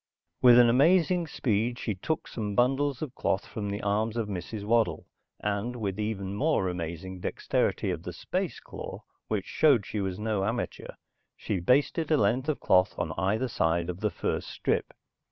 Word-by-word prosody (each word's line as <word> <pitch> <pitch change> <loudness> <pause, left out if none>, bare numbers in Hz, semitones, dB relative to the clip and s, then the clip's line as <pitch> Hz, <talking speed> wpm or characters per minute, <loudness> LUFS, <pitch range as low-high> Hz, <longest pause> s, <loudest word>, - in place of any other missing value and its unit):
With 120 -1 +8
an 120 -1 +8
amazing 170 +7 +4
speed, 120 -3 0
she 110 - -2
took 150 +12 -3
some 105 -3 -4
bundles 135 +3 +2
of 140 -5 -6
cloth 95 - -1
from 105 -2 -5
the 100 +1 -4
arms 110 +3 0
of 115 -2 -1
Mrs. 100 +2 -5
Waddle, 115 +1 +1 0.4
and 105 +4 -2
with 105 -4 -3
even 100 -3 -2
more 120 -3 +1
amazing 90 +1 -5
dexterity - - 0
of - - -4
the - - -6
space - - -3
claw, - - -8 0.2
which 105 -3 -1
showed 140 -10 +3
she 105 - -4
was 95 -2 -2
no 105 -2 -1
amateur, - - -3 0.4
she 100 - -2
basted 140 - +2
a 155 - +4
length 125 +6 +1
of 155 - 0
cloth 90 +1 +3
on 85 -2 -2
either 105 +9 0
side 85 -6 0
of 90 - -10
the 105 0 +1
first - - -2
strip. - - -1
110 Hz, 175 wpm, -28 LUFS, 95-125 Hz, 0.4 s, With